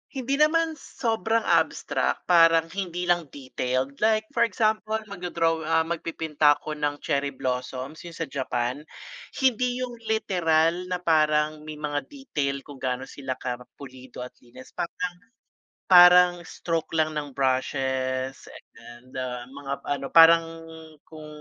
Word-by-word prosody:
hindi 270 +2 -2
naman 320 0 +2
sobrang 225 -2 -1
abstract - - 0
parang 165 -1 +4
hindi 180 -2 -4
lang 175 -2 +1
detailed, 130 0 -3
like 215 0 +2
for 235 0 +2
example 215 +1 0 0.2
magdo-draw, 170 -3 -1
ah, 165 0 +3
magpipinta 160 -3 +1
ako 155 - -8
ng 145 0 -2
cherry 140 -2 -1
blossoms 130 +3 -4
yung 170 - -10
sa 165 - -3
Japan. 130 -1 -2 0.6
Hindi 250 -1 +1
yung 240 -2 -7
literal 180 -5 +1
na 180 -1 -4
parang 155 -1 +2
may 155 - -6
mga 150 -1 -2
detail 145 - -4
kung 145 -2 -12
gaano 130 -1 -2
sila 135 -2 -5
ka 125 -1 -5 0.2
pulido 130 -2 -10
at 125 - -9
linas 125 +2 -15
parang, 175 +1 -4 0.7
parang 180 0 +8
stroke 165 -1 -4
lang 155 0 +2
ng 150 -1 -4
brushes, 130 0 -1 0.4
ah, 125 +1 -7
mga 140 0 -7
ano, 140 -1 -2
parang 165 0 +7 0.6
kung 155 -1 -11
155 Hz, 130 wpm, -25 LUFS, 135-180 Hz, 0.7 s, parang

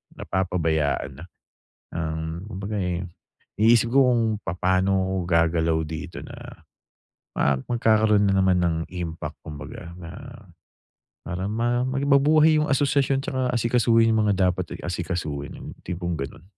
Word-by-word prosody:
napapabayaan 80 -7 -1
na. - - -8 0.7
Um, 80 +1 -4
kumbaga, 105 0 -4
eh, 90 -1 -1 0.6
iniisip 115 +1 +4
ko 135 -2 +5
kung 120 -2 +3 0.2
papaano 95 +2 +1
ako 95 0 -1
gagalaw 85 -1 +2
dito 80 -1 -7
na - - -11 1.1
ma 70 - +3
magkakaroon 110 -3 +3
na 100 - +2
naman 95 -1 +3
ng 85 -2 +1
impact 85 -3 -5
kumbaga 80 +3 -8
na, 85 0 -8 1.2
parang 95 +3 -3
ma 120 +2 0
maging 135 +1 0
mabuhay 155 +3 +5
yung - - -2
asosasyon 140 0 +2
tsaka 130 -1 -2 0.2
asikasuhin 115 -1 +3
yung 110 - +3
mga 100 - +3 0.2
dapat, 90 -1 -5
eh, - - -11
asikasuhin, 85 -5 -4
yung - - -9
tipong 90 -1 -3
gano'n. 70 +2 -6
95 Hz, 135 wpm, -24 LUFS, 85-115 Hz, 1.2 s, ko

